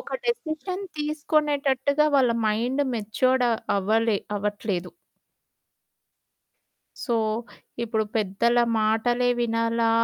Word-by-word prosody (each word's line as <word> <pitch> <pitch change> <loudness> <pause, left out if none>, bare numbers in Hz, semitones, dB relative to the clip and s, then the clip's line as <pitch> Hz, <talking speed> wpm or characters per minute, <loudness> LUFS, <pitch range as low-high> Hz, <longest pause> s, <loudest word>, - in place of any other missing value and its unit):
ఒక - - -5
డెసిషన్ 370 -3 -3 0.2
తీసుకొనేటట్టుగా 295 -2 +1
వాళ్ళ 255 -3 +4 0.2
mind 240 +6 +1
matured 245 +4 +1 0.3
అవ్వలే 220 +2 +1 0.2
అవ్వట్లేదు. 205 -3 -3 2.1
సో, 240 -3 0 0.7
ఇప్పుడు 220 -1 0
పెద్దల 220 +3 +1 0.2
మాటలే 240 +3 +2
వినాలా? 230 0 +1
235 Hz, 80 wpm, -25 LUFS, 220-280 Hz, 2.1 s, వాళ్ళ